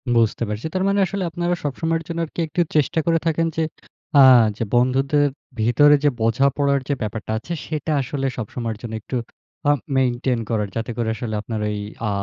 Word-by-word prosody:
বুঝতে 115 0 +2
পারছি। 105 +4 -4
তার 185 - +1
মানে 200 0 +2
আসলে 195 0 -3
আপনারা 175 +1 -1
সবসময়ের 165 +3 -1
জন্য 170 0 -4
আরকি, 160 - -10
একটু 160 +3 0
চেষ্টা 150 +2 +2
করে 165 -1 +3
থাকেন 165 +1 +1
যে, 160 - +2 0.6
আ - - +10 0.4
যে, - - -1
বন্ধুদের 135 +4 +3 0.3
ভিতরে 145 +6 +5
যে, 145 - +5
বোঝাপড়ার 140 +4 +2
যে, 145 - +1
ব্যাপারটা 110 0 -4
আছে, 170 +9 -5
সেটা 155 0 -3
আসলে 135 +1 -3
সবসময়ের 115 0 -4
জন্য 115 -2 -6
একটু 125 - -4 0.5
আ - - +7 0.3
মেইনটেইন 125 -1 +1
করার, 105 -3 0
যাতে 115 +1 -3
করে 115 -1 0
আসলে 110 -2 -4
আপনার 110 0 -4
ওই 105 - -2 0.3
আ - - 0
135 Hz, 180 wpm, -22 LUFS, 115-160 Hz, 0.6 s, আ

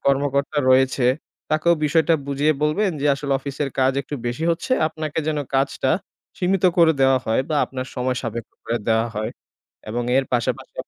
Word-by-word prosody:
কর্মকর্তা 140 +1 +1
রয়েছে, 130 -1 +3 0.4
তাকেও 155 +3 +3
বিষয়টা 160 +2 +3
বুঝিয়ে 140 +2 +2
বলবেন। 185 +7 +2
যে 145 - +1
আসলে 140 0 -3
অফিসের 140 +1 -3
চকাজ 130 0 +2
একটু 145 - -6
বেশি 120 +7 -2
হচ্ছে, 170 +10 -1 0.2
আপনাকে 155 -1 -5
যেন 155 -1 0 0.2
কাজটা 135 0 +1 0.5
সীমিত 185 +1 +1
করে 165 -1 +6
দেওয়া 135 0 +5
হয় 110 - +2
বা 155 - 0
আপনার 130 -1 -6
সময় 125 0 -1
সাপেক্ষ 115 -2 -5
করে 120 +1 -1
দেওয়া 110 0 +3
হয় 110 +2 -2 0.6
এবং 120 +2 -2
এর 135 - +2
পাশাপাশি 120 -1 -1
140 Hz, 165 wpm, -22 LUFS, 130-155 Hz, 0.6 s, করে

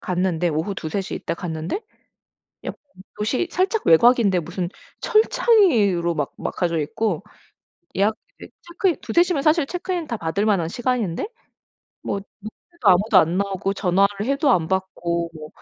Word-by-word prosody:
갔는데 180 -1 0
오후 160 +5 -2
2-3 175 +2 -3
시 - - -6
이때 - - -3
갔는데 165 - -4 0.8
약간 - - -6 0.4
도시 235 +11 0
살짝 385 +4 0
외곽인데 200 +1 +5
무슨 175 +2 -4 0.3
철창이 430 - +4
으로 170 0 -1
막 145 -3 -2
막혀져 170 -2 -1
있고 170 +4 -2 0.7
예약 205 +3 +2 0.2
이제 - - -11
체크인 350 0 0
2-3 340 - +3
시면 355 -5 -1 0.3
체크인 360 0 -3
다 235 - -3
받을 185 +4 -1
만한 195 -6 +2
시간인데 240 - -1 0.8
뭐 200 - -2 0.2
노크해도 220 - -4
아무도 195 +3 +5
안 165 +1 +2
나오고 195 0 -1
전화를 200 +2 +1
해도 280 +2 +2
안 170 -9 +3
받고 170 -2 -2
뭐 155 -1 -9
195 Hz, 290 characters per minute, -22 LUFS, 170-255 Hz, 0.8 s, 외곽인데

